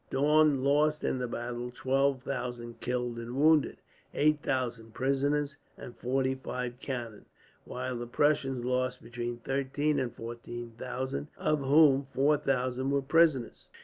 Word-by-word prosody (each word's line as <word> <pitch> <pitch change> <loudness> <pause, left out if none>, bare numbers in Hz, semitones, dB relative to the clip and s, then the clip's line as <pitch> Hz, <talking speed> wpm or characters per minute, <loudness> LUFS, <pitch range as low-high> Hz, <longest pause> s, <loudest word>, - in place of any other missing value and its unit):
Daun 150 0 +3
lost 150 +2 +2
in 130 - 0
the 125 - -2
battle 120 +1 -4
twelve 135 +1 +1
thousand 120 -3 -5
killed 125 -1 -2
and 120 +1 -6
wounded, 155 +1 +4 0.4
eight 150 0 +3
thousand 120 -4 -2
prisoners, 140 +2 0 0.2
and 120 - -9
forty 130 +1 0
five 125 -2 -5
cannon; 120 -5 -5 0.4
while 125 0 -4
the 120 0 -5
Prussians 135 -1 +1
lost 125 0 -1
between 120 0 -4
thirteen 140 +4 -1
and 125 -2 -1
fourteen 120 +1 -7
thousand, 130 +4 -4
of 155 -1 +1
whom 140 -1 +5
four 145 +3 +4
thousand 130 -1 -1
were 140 0 +1
prisoners. 150 -4 +2
130 Hz, 140 wpm, -30 LUFS, 120-140 Hz, 0.4 s, whom